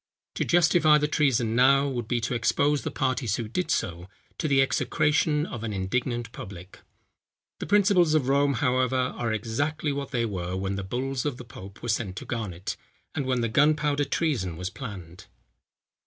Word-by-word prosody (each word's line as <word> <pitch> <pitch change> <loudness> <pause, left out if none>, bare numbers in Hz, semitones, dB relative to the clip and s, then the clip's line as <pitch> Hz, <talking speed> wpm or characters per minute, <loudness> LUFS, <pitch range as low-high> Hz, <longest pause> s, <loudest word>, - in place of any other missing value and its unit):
To - - -1
justify 165 -3 +4
the 150 0 +1
treason 125 -7 +1
now, 135 +3 +5
would 120 -5 -3
be 120 0 0
to 115 - -2
expose 140 +5 +1
the - - -3
parties 130 -5 -1
who 115 - -4
did 175 +12 -2
so, 85 +1 -2 0.3
to 160 - 0
the 135 -2 +3
execration 150 +2 +2
of 120 -7 -7
an 110 -2 -3
indignant 120 +5 -2
public. 95 -4 -10 0.8
The - - -5
principles 190 -5 +4
of 140 -5 +2
Rome, 140 +1 +3
however, 130 0 +1
are 125 -2 -1
exactly 145 +8 -1
what 140 0 -4
they 120 -4 0
were 90 -4 -3
when 95 +1 -2
the 100 - -4
bulls 125 +5 -2
of 145 -4 -2
the 125 - -9
pope 100 -3 -12
were - - -4
sent 105 -4 -1
to - - -7
Garnet, 105 -4 -4 0.4
and 140 - -2
when 125 -2 +1
the 115 - +1
gunpowder 145 +3 +2
treason 120 - -1
was 90 +2 -4
planned. 95 -8 -9
125 Hz, 180 wpm, -26 LUFS, 105-145 Hz, 0.8 s, now